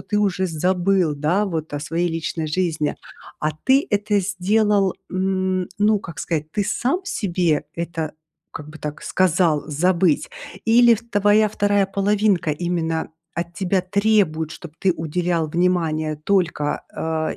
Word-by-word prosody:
ты 210 - -1
уже 190 -2 +1
забыл, 180 0 +1
да, 155 +8 +1
вот 160 -6 -4
о 145 - -3
своей 165 +4 -1
личной 165 -1 -3
жизни. 155 -2 -1 0.4
А 155 - 0
ты 270 +5 +4
это 205 0 +1
сделал, 200 +1 +1 0.2
н 185 -1 0
ну, 210 +1 +3
как 170 -5 -10
сказать, 155 -2 -2
ты 205 +5 -1
сам 260 - 0
себе 175 - 0
это 165 -2 -4 0.4
как 150 +1 -8
бы 155 - -11
так 150 0 -6
сказал- 175 -4 +2
забыть, 170 +2 +1 0.3
или 235 +1 +6
ф 230 - -7
твоя 205 +1 +4
2 205 -1 +2
половинка 200 -3 +1
именно 165 0 -2 0.2
от 170 +1 -4
тебя 185 +1 0
требует, 185 -5 +1
чтоб 170 -1 -10
ты 190 - +2
уделял 165 +1 -1
внимание 160 -2 0
только, 160 -2 0
э, 160 -1 -2
180 Hz, 140 wpm, -22 LUFS, 160-200 Hz, 0.4 s, или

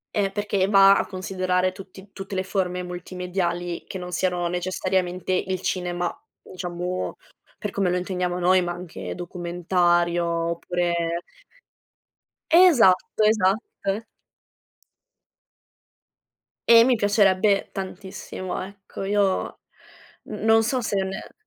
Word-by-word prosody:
E 200 -2 +2
perché 200 -2 0
va 195 -1 +7
a - - 0
considerare 185 -1 -1
tutti 190 +1 -13
tutte 195 0 -7
le 185 - 0
forme 180 -2 -2
multimediali 180 0 -3
che - - -6
non 180 -1 -7
siano 180 -1 0
necessariamente 180 +1 -1
il 185 0 -1
cinema, 175 -2 -2 0.2
diciamo, 180 0 -5 0.4
per 210 -3 -4
come 195 -2 0
lo 180 - +1
intendiamo 180 -1 -2
noi, 185 +1 +4
ma 175 -1 -2
anche 125 - -7
documentario, 175 0 0
oppure 170 0 -1 1.3
Esatto, 250 - +5
esatto. 205 0 0 2.7
E 230 0 +8
mi 255 -1 +4
piacerebbe 205 -2 +3
tantissimo, 190 -1 -6
ecco. 195 0 -9
Io 195 -1 0 0.7
n - - -9
non 225 0 +5
so 255 +3 0
se 215 -3 -2
ne 190 0 -6
185 Hz, 110 wpm, -24 LUFS, 175-195 Hz, 2.7 s, E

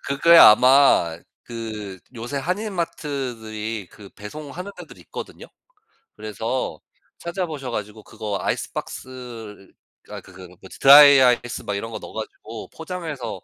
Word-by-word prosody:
그게 160 +5 +5
아마 125 - +6 0.3
그 110 -5 -7 0.2
요새 120 +5 -6
한인 185 +9 -3
마트들이 120 - -5
그 100 -2 -14
배송하는 150 - -9
데들 - - -12
있거든요. - - -10 0.7
그래서 110 -4 -4 0.4
찾아보셔 165 -7 -5
가지고 105 0 -6
그거 105 -2 -5
아이스박스를 115 -6 -6 0.4
아이 - - -8
그 - - -17
그거 90 -1 -13
뭐지 95 - -13
드라이아이스 135 -4 +7
막 105 -3 -3
이런 115 +3 -5
거 110 - -6
넣어 - - -11
가지고 110 0 -8
포장해서 160 - -6
120 Hz, 305 characters per minute, -22 LUFS, 105-145 Hz, 0.7 s, 드라이아이스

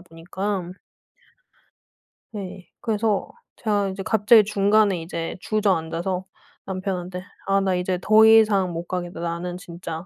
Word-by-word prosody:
보니깐. 180 +2 -5 1.6
네. 190 -4 -8
그래서 215 -2 0 0.3
제가 205 -3 0
이제 190 +1 -5
갑자기 220 +2 +5
중간에 200 -2 +2
이제 165 0 -5
주저앉아서 185 -3 -1 0.4
남편한테 185 -1 -4 0.2
"아 195 0 +3
나 190 -1 +1
이제 180 0 -1
더 215 +3 +6
이상 215 -4 +5
못 170 +1 -5
가겠다. 175 -2 -4
나는 170 +1 -3
진짜 170 -2 -7
190 Hz, 255 characters per minute, -23 LUFS, 175-205 Hz, 1.6 s, 더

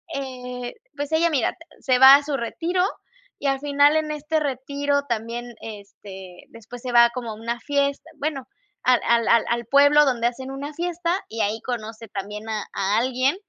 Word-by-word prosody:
eh, 250 -2 -6 0.2
pues, 290 +1 -4
ella, 335 +2 +3
mira, 265 -6 0 0.3
se 255 -2 +2
va 265 +1 +10
a 290 - -5
su 285 -2 -2
retiro 340 +10 -1 0.6
y 285 - -2
al 270 -1 +1
final 290 +1 +3
en 305 -1 -1
este 300 +1 -1
retiro 285 +1 -1
también, 235 +1 -4
este, 195 -3 -11
después 230 +2 -12
se 250 - -4
va 235 0 +7
como 240 -3 -5
a - - -7
una 235 +2 -4
fiesta, 280 +1 -1
bueno, 280 -3 -3 0.4
al 250 -1 +4
al 235 -1 +3
al 230 -1 +4
al 235 -1 -1
pueblo 285 +3 +5
donde 240 -3 +1
hacen 260 +2 -5
una 285 +2 -6
fiesta 350 +1 -1
y 225 0 -4
ahí 215 +2 -1
conoce 225 -2 -6
también 210 +2 -6
a 215 -2 -2
a 200 +2 0
alguien 255 +5 +1
255 Hz, 180 wpm, -23 LUFS, 230-285 Hz, 0.6 s, va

